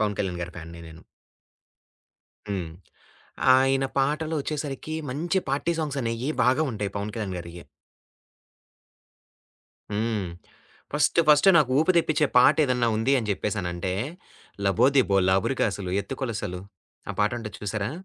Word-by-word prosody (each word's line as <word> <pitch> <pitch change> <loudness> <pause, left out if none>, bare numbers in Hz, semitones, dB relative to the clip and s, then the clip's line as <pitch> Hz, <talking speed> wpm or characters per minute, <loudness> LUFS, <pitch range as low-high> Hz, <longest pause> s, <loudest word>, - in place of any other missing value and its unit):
'పవన్ 105 -2 0
కళ్యాణ్ 90 -3 -3
గారి' 85 0 -7
ఫ్యాన్‌ని 85 0 -9
నేను. 80 0 -13 1.5
హ్మ్. 90 -5 -3 0.9
ఆయన 135 +1 +2
పాటలు 155 +4 0
ఒచ్చేసరికి 150 +1 -4 0.2
మంచి 170 +7 -1
పార్టీ 145 +5 0
సాంగ్స్ 145 -3 -2
అనేవి 115 +5 -2
బాగా 130 +5 +3
ఉంటాయి 100 -2 -4
'పవన్ 105 +1 -3
కళ్యాణ్ 105 -5 -4
గారియి'. 85 0 -9 2.3
హ్మ్. 105 -2 -1 0.7
ఫస్ట్, 150 +2 +2
ఫస్ట్ 150 +6 +6
నాకు 140 -5 +2
ఊపు 160 - +2
తెప్పించే 155 -3 +3
పాట 135 +5 +7
ఏదైనా 125 -3 +1
ఉంది 120 +5 +1
అని 110 - -4
చెప్పేసానంటే. 95 -3 -3 0.7
'లబోదిబో 115 +1 +3
లాబురికాసులు 95 -1 0
ఎత్తుకొలసలు' 105 -6 -4 0.5
ఆ - - -3
పాట 105 - +3
ఉంటది 105 -5 -7
చూసారా? 105 +1 -3
115 Hz, 120 wpm, -25 LUFS, 95-140 Hz, 2.3 s, పాట